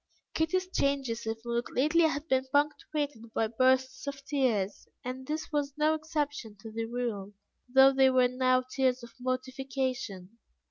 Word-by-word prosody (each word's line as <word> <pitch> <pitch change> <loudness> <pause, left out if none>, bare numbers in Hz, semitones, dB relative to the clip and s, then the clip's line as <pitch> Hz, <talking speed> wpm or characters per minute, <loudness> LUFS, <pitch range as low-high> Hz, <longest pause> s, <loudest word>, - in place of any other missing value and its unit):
Kitty's 365 +4 0
changes 275 -9 -1
of 225 0 -1
mood 235 0 -1
lately 310 +6 +3
had 305 0 -1
been 260 -1 +1
punctuated 290 -4 -1
by 225 - +2
bursts 260 +4 +1
of 275 -1 -5
tears, 230 -9 0 0.2
and 260 +1 -5
this 310 +2 -3
was 290 -1 -1
no 305 +1 +3
exception 295 -8 -3
to 225 - -9
the 225 +1 -3
rule, 225 -4 -3 0.4
though 265 +1 +7
they 265 0 +5
were 255 -1 +4
now 255 0 +2
tears 255 -1 0
of 235 -1 -11
mortification. 255 -5 -3
260 Hz, 150 wpm, -30 LUFS, 235-285 Hz, 0.4 s, though